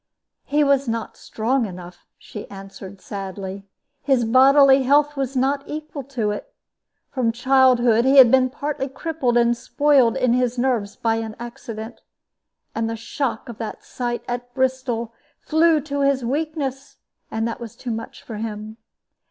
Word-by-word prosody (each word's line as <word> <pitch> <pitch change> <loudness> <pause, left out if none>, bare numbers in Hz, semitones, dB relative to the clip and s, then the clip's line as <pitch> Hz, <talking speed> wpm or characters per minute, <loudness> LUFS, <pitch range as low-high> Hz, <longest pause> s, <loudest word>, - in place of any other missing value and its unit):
"He 295 +1 +2
was 280 -1 +2
not 230 -1 -3
strong 235 +2 -1
enough," 180 -1 -11
she 210 - -10
answered, 195 0 -10
sadly; 195 0 -7 0.3
"his 265 -4 +2
bodily 270 +3 +6
health 290 +3 +3
was 270 -1 -3
not 270 +2 +1
equal 305 -1 -6
to 240 -6 -2
it. 210 - -6 0.6
From 245 -4 0
childhood 245 -2 +4
he 270 +2 +4
had 250 -3 +9
been 260 -1 +4
partly 285 0 -3
crippled 270 -3 -1
and 235 0 +3
spoiled 270 -2 +2
in 255 -2 +2
his 250 0 0
nerves 240 -5 0
by 225 -1 0
an 220 -1 -5
accident. 235 -2 -8 0.7
And 225 0 -1
the 225 - -3
shock 230 +1 -3
of 235 -2 -9
that 220 -2 -6
sight 240 -1 -4
at 245 0 -4
Bristol 255 -3 -1 0.3
flew 320 0 +3
to 285 0 -3
his 275 -3 +1
weakness, 280 -1 -3 0.3
and 225 +1 -2
was 235 -3 -9
too 245 - -6
much 225 0 -6
for 225 - -7
him. 215 0 -6
245 Hz, 150 wpm, -22 LUFS, 225-275 Hz, 0.7 s, had